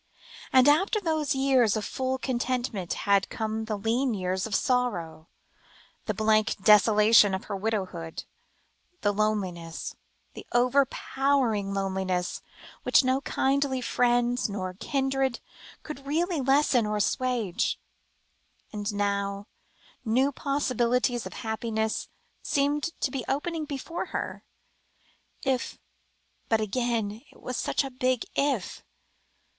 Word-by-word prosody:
And 260 +1 +6
after 380 +9 +4
those 310 -6 0
years 260 -5 +3
of 215 - -3
full 260 0 -2
content 250 -1 -1 0.2
had 200 -1 +2
come 220 0 -3
the 215 -1 -2
lean 230 +4 0
years 185 +1 -1
of 210 - -2
sorrow 180 -11 -1 0.8
the - - +1
blank 215 -1 +2
desolation 210 -1 +6
of 190 - -6
her 205 - -5
widowhood, 190 -6 -3 0.8
the 205 - +2
loneliness, 190 -6 -2 0.4
the - - -9
overpowering 255 -3 +2
loneliness, 190 -2 -1 0.4
which - - +4
no 260 +1 +1
kindly 275 -1 0
friends 245 -1 +1
nor 185 -2 -4
kindred 270 +3 -1 0.4
could 300 -3 -8
really 330 +1 0
lessen 270 -3 +3
or 210 0 -1
assuage. 230 -3 0 0.9
And 205 0 -2
now, 200 0 -1 0.6
new 255 +5 +2
possibilities 250 -4 0
of - - -10
happiness 220 0 -2 0.3
seemed 285 +1 +1 0.2
to 265 - 0
be 265 -3 -3
opening 315 +3 -1
before 295 +5 -4
her, - - -4 1.0
if 265 -2 -1 0.7
but 225 - +3
again 220 -1 -1
it - - -19
was 250 - -5
such - - 0
a 270 - -6
big 255 -1 0
"if." 275 -9 -1
240 Hz, 115 wpm, -27 LUFS, 205-270 Hz, 1.0 s, And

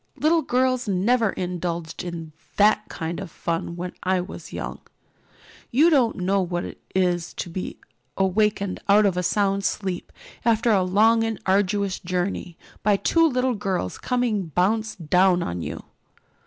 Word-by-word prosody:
Little 325 +2 +3
girls 255 -3 +1
never 215 +4 +2
indulged 175 -3 -4
in 170 -3 -6 0.3
that 210 +1 +4
kind 165 +2 -4
of 195 -3 -6
fun 170 0 -3
when 180 +1 -5
I 185 0 +1
was 180 +2 -7
young. - - -6 0.9
You 310 +8 +4
don't 255 -7 +3
know 190 +2 +1
what 175 -1 -2
it - - -9
is 175 -2 0
to 175 - -5
be 185 +2 -5 0.4
awakened 200 0 +1
out 205 +1 +6
of 195 -3 +2
a 180 - 0
sound 195 +2 +1
sleep, 190 -3 -2 0.3
after 230 0 +3
a 200 -3 +4
long 220 +5 +4
and 225 -1 -2
arduous 195 0 +1
journey, 180 -1 -3 0.2
by 205 -1 +3
two 330 +8 +3
great 250 -3 0
girls 185 - -2
coming 240 -7 0
bounce 210 +7 0
down 180 +2 +3
on 90 0 -4
you." - - -5
195 Hz, 155 wpm, -24 LUFS, 180-220 Hz, 0.9 s, out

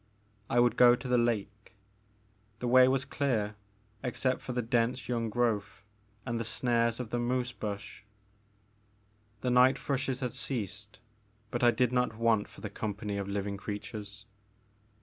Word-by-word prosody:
I 120 - +3
would 120 -1 +3
go 120 -1 +8
to 125 +1 -8
the 125 -1 +3
lake. 110 -2 -2 0.8
The 125 - -3
way 130 +1 +7
was 130 +1 +1
clear 115 -8 -1 0.5
except 130 0 -1
for - - -5
the 125 0 -1
dense 120 +2 0
young 115 -2 -1
growth 105 -4 -1 0.4
and 120 -1 -2
the - - -1
snares 115 0 +1
of 125 -3 -5
the 120 - 0
moose 125 +1 0
bush. 105 -3 -6 1.4
The 125 - 0
night 125 +2 +5
thrushes 135 -1 -2
had 125 -2 -2
ceased 110 -4 -4 0.5
but 120 - -2
I 120 - +7
did 120 +1 +2
not 125 -3 0
want 115 -2 +2
for 110 - -14
the 105 - -4
company 105 -1 -4
of 100 -1 -3
living 100 0 -3
creatures. 105 +1 -7
120 Hz, 155 wpm, -30 LUFS, 105-125 Hz, 1.4 s, go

